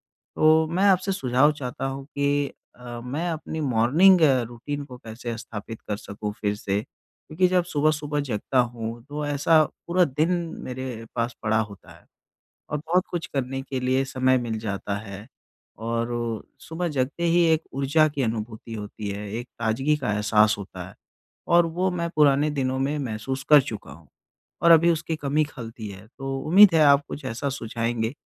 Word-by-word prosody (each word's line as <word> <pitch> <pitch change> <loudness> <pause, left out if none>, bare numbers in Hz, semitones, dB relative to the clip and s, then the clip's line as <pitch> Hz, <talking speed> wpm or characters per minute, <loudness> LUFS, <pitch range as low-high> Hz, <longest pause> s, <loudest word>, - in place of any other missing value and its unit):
तो 160 +1 +2
मैं 185 +4 +1
आपसे 190 0 +3
सुझाव 135 -3 +3
चाहता 135 -3 -5
हूँ 135 0 -5
कि 145 -1 0 0.3
अ, 120 -1 -8
मैं 150 +8 -2
अपनी 160 0 -4
मॉर्निंग 150 +9 +5 0.3
रूटीन 140 +4 -5
को 125 -3 -11
कैसे 115 0 -6
स्थापित 115 -1 -8
कर 105 - -1
सकूँ 105 0 -6
फिर 105 -1 0
से। 100 -1 -1
क्योंकि 155 +7 -3
जब 180 -1 +2
सुबह-सुबह 150 -2 0
जगता 125 +2 -1
हूँ 120 -1 -4
तो 150 +1 -4
ऐसा 145 +2 +4 0.2
पूरा 180 +1 +3
दिन 155 +3 0 0.3
मेरे 125 -3 -5
पास 115 0 -1
पड़ा 110 0 +2
होता 105 -3 -8
है - - -19 0.7
और 150 - -1
बहुत 165 +5 +1
कुछ 175 -1 -2
करने 135 -1 -2
के 135 -1 -4
लिए 130 +1 +2
समय 130 -1 +2
मिल 115 -2 -3
जाता 100 -2 -3
है 100 +2 -9 0.5
और 115 +1 -2 0.5
सुबह 170 +2 -4
जगते 135 +6 -1
ही 170 +1 +4
एक 160 0 0
ऊर्जा 140 +4 +3
की 140 -2 -2
अनुभूति 110 0 -4
होती 105 -1 -6
है, 100 +1 -5
एक 120 +2 -4
ताज़गी 130 +7 +1
का 130 -7 -2
एहसास 105 0 +3
होता 100 - -8
है - - -16 0.5
और 170 0 +5
वो 180 +3 0
मैं 170 -1 -2
पुराने 145 0 +4
दिनों 130 0 0
में 140 +3 0
महसूस 130 +1 -4
कर 150 -2 +9
चुका 110 - -7
हूँ 80 +2 -14 0.6
और 170 - +7
अभी 165 +1 +7
उसकी 160 0 -2
कमी 150 0 +1
खलती 115 -5 -8
है। 100 +2 -11
तो 135 0 -3
उम्मीद 190 +2 +8
है 160 - +5
आप 140 0 +6
कुछ 140 - -7
ऐसा 125 +3 -2
सुझाएंगे 115 -2 -2
135 Hz, 175 wpm, -25 LUFS, 115-155 Hz, 0.7 s, कर